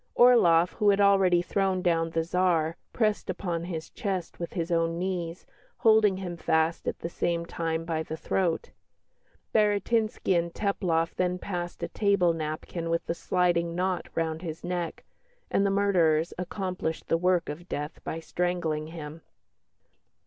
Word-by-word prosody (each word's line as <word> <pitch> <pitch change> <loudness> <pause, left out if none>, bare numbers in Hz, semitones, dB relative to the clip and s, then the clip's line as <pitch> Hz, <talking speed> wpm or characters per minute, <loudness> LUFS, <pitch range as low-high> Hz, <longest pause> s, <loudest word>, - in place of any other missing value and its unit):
Orloff, 180 -9 +6
who 210 -2 +2
had 200 0 +4
already 195 -3 +4
thrown 190 0 0
down 165 -2 +2
the 165 0 0
Tsar, 170 -2 +1 0.2
pressed 215 -3 0
upon 175 -2 -2
his 160 -3 -5
chest 190 -4 -4
with 170 - -5
his 170 -2 -2
own 165 0 +1
knees, 175 -2 -3 0.3
holding 220 -3 +4
him 180 -3 -5
fast 160 0 +1
at - - -1
the - - -2
same 170 0 -1
time 165 -1 -2
by 160 -1 -1
the 160 0 -5
throat. 170 -1 -1 0.8
Baratinski 215 -1 +2
and 170 0 0
Teplof 170 -4 0
then 180 0 0
passed 175 -2 -5
a - - 0
table 200 -5 +2
napkin 165 +2 -4
with 165 0 -1
a - - 0
sliding 170 -1 +1
knot 185 0 -1
round 160 -1 -1
his 165 -2 -6
neck, 175 -2 -3 0.5
and 200 - +3
the - - +2
murderers 175 -5 +2
accomplished 180 -2 -4
the 165 - +2
work 180 -1 +2
of 170 +5 -7
death 150 +2 -4
by 165 - -4
strangling 165 -3 -2
him." 160 -1 -8
175 Hz, 155 wpm, -28 LUFS, 165-190 Hz, 0.8 s, Orloff